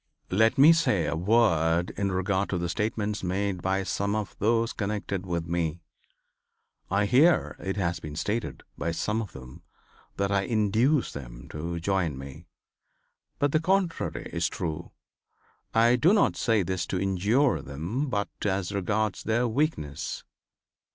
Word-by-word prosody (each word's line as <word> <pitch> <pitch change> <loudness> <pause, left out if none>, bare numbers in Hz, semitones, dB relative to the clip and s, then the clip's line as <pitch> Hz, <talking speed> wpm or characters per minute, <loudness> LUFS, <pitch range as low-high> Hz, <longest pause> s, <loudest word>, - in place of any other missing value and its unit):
"Let 110 +4 +3
me 150 +5 +8
say 105 - +2
a 75 - -1
word 85 -4 +2
in 100 0 -2
regard 95 +1 0
to 95 - -1
the 85 0 -2
statements 105 +1 -2
made 95 0 -1
by 95 +1 0
some 100 +2 -1
of 105 -3 -3
those 115 +2 +2
connected 100 -2 -3
with 85 -1 -2
me. 85 -1 -2 1.1
I 100 +1 +2
hear 140 +11 +4
it 95 +1 -3
has 85 -3 -1
been 75 -1 -8
stated 105 +8 -3
by 85 - -2
some 105 +5 -1
of 105 - -7
them 65 -1 -11 0.6
that 100 0 0
I 100 -1 +3
induced 110 +7 +1
them - - -9
to 85 +3 -4
join 85 -5 0
me. 70 0 -10 0.9
But 145 0 +1
the 155 - +3
contrary 185 0 0
is - - +1
true. 80 -2 -4 0.8
I 115 +2 +4
do 165 - +4
not 210 - +3
say 110 -4 +2
this 95 +1 -2
to 95 - -2
injure 100 - +2
them, 85 - -3
but 100 -4 -1 0.2
as 95 -2 -1
regards 100 +1 -1
their 115 +3 +1
weakness. 115 - -2
100 Hz, 150 wpm, -27 LUFS, 85-115 Hz, 1.1 s, me